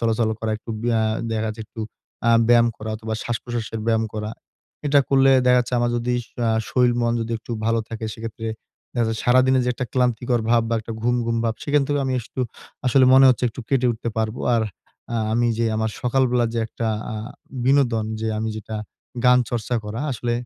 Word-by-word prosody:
চলাচল 115 -1 +1
করা 110 - -1
একটু 115 - -10
ব্যা 115 -2 +2 0.3
দেখা 110 0 -1
যায় 110 - -6
একটু 115 - -9 0.5
আ - - +6 0.2
ব্যায়াম 120 -1 +6
করা 110 0 -6
অথবা, 110 0 -5
শ্বাসপ্রশ্বাসের 115 -1 -3
ব্যায়াম 115 -1 +2
করা। 105 0 -3 0.6
এটা 145 0 +5
করলে 135 0 +5 0.2
দেখা 125 0 +6
যাচ্ছে 125 +1 -3
আমার 120 0 +1
যদি 120 +1 -1
শ - - -27 0.2
আ - - +3 0.2
শরীর 125 -1 +3
মন 115 0 +2
যদি 115 +1 -3
একটু 115 - -13 0.2
ভালো 115 0 +2
থাকে, 115 0 -5
সেক্ষেত্রে 115 0 -6 0.5
দেখা 120 -2 +1
যাচ্ছে 110 -1 -3
সারাদিনের 130 +1 +4
যে - - 0
একটা 130 -1 -3
ক্লান্তিকর 125 -1 +1
ভাব 120 -1 +4
বা 115 - 0
একটা 115 +1 -7
ঘুম, 120 +1 +2
ঘুম 115 0 0
ভাব, 115 -1 0
সেখান 145 -1 +3
থেকে 145 -1 0
আমি 130 - -1
আস 120 - -6
সু 130 - -2 0.5
আসলে 130 +1 +5
মনে 135 0 +8
হচ্ছে 125 0 +3
একটু 120 - -8
কেটে 130 -2 +2
উঠতে 115 +1 -5
পারবো। 110 +2 -1
আর 115 - +2 0.5
আ - - +1 0.2
আমি 120 +1 +2
যে 115 - +2
আমার 110 0 0
সকালবেলা 125 -1 +2
যে - - 0
একটা 115 +1 -4 0.3
আ - - -4 0.5
বিনোদন 125 -5 +3 0.2
যে, 110 - -1
আমি 110 0 -1
যেটা 110 0 -6 0.5
গান 125 0 +7
চর্চা 120 0 -2
করা। 110 +3 -4
আসলে 120 0 -2
120 Hz, 205 wpm, -22 LUFS, 110-125 Hz, 0.6 s, মনে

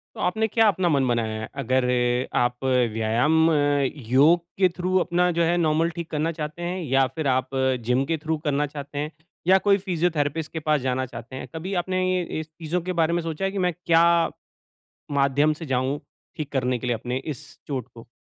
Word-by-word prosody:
तो - - -8
आपने 220 +5 +1
क्या 225 +1 +3
अपना 185 -2 +1
मन 140 -5 +2
बनाया 110 -2 -1
है? - - -5
अगर 130 +1 +1
अ, 125 0 +1
आप 125 +1 0
व्यायाम, 125 +6 +2 0.6
योग 155 +6 +6 0.2
के 185 -2 +5
थ्रू 185 +1 0
अपना 180 0 +2
जो 170 - +4
है, 170 +1 +2
नॉर्मल 165 +1 +2
ठीक 170 -1 -5
करना 155 +2 -1
चाहते 155 +1 -6
हैं, 180 +2 -2
या 135 -3 +2
फिर 155 -3 -2
आप 130 0 +1 0.4
जिम 125 +2 +2
के - - +2
थ्रू 160 0 -1
करना 145 -1 +1
चाहते 145 0 -7
हैं, 150 +1 -2 0.4
या 190 +1 +6
कोई 200 0 +5
फिज़ियोथेरेपिस्ट 165 -4 -1
के 160 - -3
पास 150 -2 +3
जाना 130 0 -1
चाहते 125 +1 -9
हैं? - - -7
कभी 185 +5 -4
आपने 185 +1 -1
ये, 180 - +1 0.2
इस 160 - -6
चीजों 160 +2 -3
के 185 +2 -3
बारे 160 +1 +1
में 170 -1 0
सोचा 165 +2 -4
है 195 - +1
कि 200 - -3
मैं - - -1
क्या 165 0 +5 1.2
माध्यम 140 +3 +3
से - - -5
जाऊँ, 130 +2 -1 0.4
ठीक 150 -3 -5
करने 125 -2 0
के 125 - -6
लिए 120 - +1
अपने 125 +3 -4
इस 150 -2 -6 0.2
चोट 130 -5 -4
को? 115 0 -13
150 Hz, 210 wpm, -24 LUFS, 130-170 Hz, 1.2 s, योग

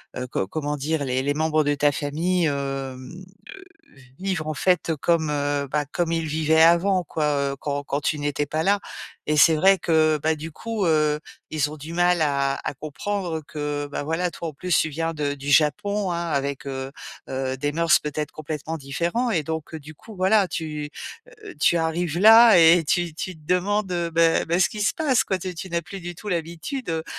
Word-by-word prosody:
heu, 125 0 -4
co 95 - -2
comment 150 +4 -3
dire? 150 +1 -1
Les 130 0 -1
les 145 +1 0
membres 155 0 +1
de 145 - +1
ta 145 0 +3
famille, 165 +5 -1
hem, 145 - +1
heu, 135 +4 -6 0.9
vivre 190 -5 -2
en 155 - -2
fait 180 0 +1
comme, 160 -2 +1
heu, 145 -1 -1
bah, 150 +1 0
comme 165 +3 -2
ils 165 -1 -1
vivaient 160 +1 +3
avant, 180 +3 +4
quoi, 155 0 -3 0.3
heu, - - -6
quand 145 -1 -3
quand 140 +1 -2
tu 150 - 0
n'étais 145 0 -1
pas 155 +2 -2
là, 200 +3 +3 0.5
et 150 0 +1
c'est 160 +2 +6
vrai 190 +5 +4
que 155 -2 +2
bah 160 0 +2
du 155 +2 -7
coup, 220 +5 -4
heu, 150 -2 +2 0.3
ils 150 -2 0
ont 155 - -8
du 155 +3 -9
mal 175 0 +2
à 140 -2 0
à - - -2
comprendre 160 +4 -4
que, 145 -1 -3
bah - - -3
voilà, 165 +4 -1
toi 170 - -5
en 155 - -6
plus 180 +4 0
tu - - +2
viens 165 +2 -2
de 145 -2 -2
du 140 0 -5
Japon, 185 +7 +2
hein, 170 0 -2
avec, 140 -1 -2
heu 135 0 -4 0.4
heu, 130 0 -2
des 145 +1 -1
mœurs 165 +1 +3
peut-être 150 0 -4
complètement 155 +1 -5
différents 170 - -1
et 165 -7 +1
donc 160 +1 -5
du 155 +1 -11
coup 220 +7 -14
voilà 190 +1 +3
tu, 155 -3 -4 0.6
heu, - - -9
tu 170 - +4
arrives 165 0 -1
là 225 0 +8
et 165 +1 +7
tu 175 +1 0
tu 180 +2 -5
te 155 - -20
demandes, 190 +2 0
heu, 170 -1 -1
beh 165 0 +3
beh 170 +2 +2
ce 190 - +4
qui 210 - -7
se 200 - +1
passe 265 -8 +2
quoi. 190 -3 -1
Tu 185 0 -5
tu 175 +3 -7
n'as 170 0 -1
plus 195 +4 -9
du 175 0 -7
tout 210 - -9
l'habitude, 170 - -4
heu, 160 0 -2
160 Hz, 210 wpm, -23 LUFS, 145-175 Hz, 0.9 s, là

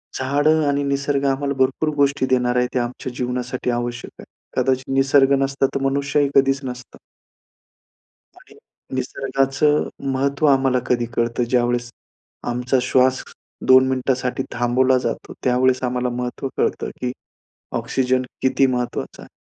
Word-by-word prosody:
झाडं 145 +4 +2
आणि 140 0 +1
निसर्ग 140 0 0
आम्हाला 140 +1 -1
भरपूर 135 +4 +1
गोष्टी 140 -1 +2
देणार 125 -1 +2
आहेत, 125 0 +2
ते 130 - +1
आमच्या 120 +1 -4
जीवनासाठी 125 0 -3
आवश्यक 120 0 -4
आहे. - - -12 0.4
कदाचित 130 0 0
निसर्ग 135 0 +4
नसता, 135 0 +1
तर 135 - -1
मनुष्यही 140 +1 +1
कधीच 135 0 +4
नसता. 125 -1 -8 1.4
आणि - - -19 0.4
निसर्गाचं 135 +3 0 0.3
महत्त्व 140 +2 0
आम्हाला 135 -2 +3
कधी 120 -1 +1
कळतं, 120 +1 0
ज्यावेळेस 120 -1 0 0.6
आमचा 125 +2 0
श्वास 130 0 +2 0.4
2 130 0 +7
मिनिटांसाठी 130 -1 -1
थांबवला 125 +2 +2
जातो. - - -4
त्यावेळेस 130 0 +2
आम्हाला 125 0 -1
महत्त्व 125 +2 -4
कळतं, - - 0
की 125 -1 -1 0.7
ऑक्सिजन 130 -1 0 0.2
किती 135 +1 +3
महत्त्वाचा 125 -2 -3
आहे. - - -13
130 Hz, 130 wpm, -21 LUFS, 125-135 Hz, 1.4 s, 2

